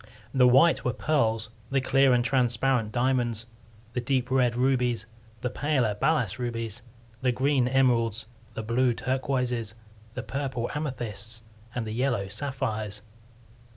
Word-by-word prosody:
The 125 -2 +5
white 135 +7 +5
were 125 - 0
pearls; 115 -7 0 0.2
the 135 - +2
clear 135 0 +4
and 120 -1 +3
transparent, 125 -3 +2
diamonds; 120 -2 0 0.5
the 125 - -1
deep 130 +1 0
red, 125 -3 +3
rubies; 125 -3 +1 0.4
the 125 -1 -2
paler, 135 -8 +1
balas 115 -2 0
rubies; 115 -3 -3 0.4
the 130 -1 +2
green, 130 +1 +2
emeralds; 120 -4 +2 0.3
the 110 - -4
blue, 120 +2 +2
turquoises; 125 -4 -1 0.4
the - - -4
purple, 135 -3 -3
amethysts; 115 -7 -5 0.3
and 120 -2 -2
the 110 - -5
yellow, 120 -5 0
sapphires. 110 -3 -3
125 Hz, 130 wpm, -27 LUFS, 115-130 Hz, 0.5 s, The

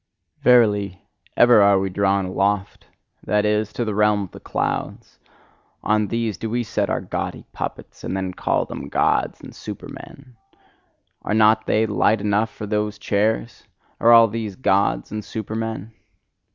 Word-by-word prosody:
Verily, 105 -6 +3 0.3
ever 120 -3 +6
are 100 -1 +5
we 95 0 0
drawn 100 0 +1
aloft 100 +1 -1 0.4
that 105 0 +1
is, 105 0 0
to 120 - -2
the 110 - -2
realm 105 0 +2
of 95 - -9
the - - -11
clouds: - - -4 0.6
on 105 -1 +1
these 115 -2 -2
do 115 - -4
we 120 +2 -1
set 110 - -2
our - - -1
gaudy - - -5
puppets, - - -7
and 95 - -3
then 95 -1 -3
call - - 0
them - - -7
Gods - - 0
and - - -12
Supermen: 130 -4 -10 0.8
Are 105 - -2
not 110 0 +4
they 110 +1 +2
light 110 0 +2
enough 105 +2 +1
for 105 - -8
those 105 0 -2
chairs! 110 +3 -1 0.3
all 115 0 +7
these 110 -2 -5
Gods 95 - +1
and 105 0 -4
Supermen? 110 0 -5
105 Hz, 150 wpm, -22 LUFS, 100-110 Hz, 0.8 s, all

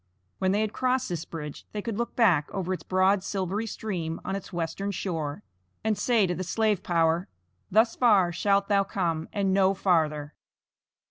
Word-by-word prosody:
When 190 0 +2
they 205 +2 +2
had 215 -1 -1
crossed 255 -1 0
this 170 -2 -3
bridge 150 -3 -7
they 210 - -3
could 230 -3 -3
look 235 +2 -3
back 180 -11 +3
over 185 -1 -2
its 185 - -4
broad 190 +1 +2
silvery 195 +3 -2
stream 175 -7 -4
on 190 - -2
its 195 - -7
western 175 +3 -3
shore, 165 -6 -3 0.4
and 220 0 +1
say 220 +1 +2
to 180 - -1
the 185 - -4
slave 210 +1 +1
power: 165 0 +1 0.4
"Thus 225 +3 +3
far 205 -8 +4
shalt 200 +3 +1
thou 200 -1 +3
come, 170 -5 -2
and 195 -2 0
no 195 0 +3
farther." 155 -6 +1
190 Hz, 180 wpm, -27 LUFS, 170-205 Hz, 0.4 s, far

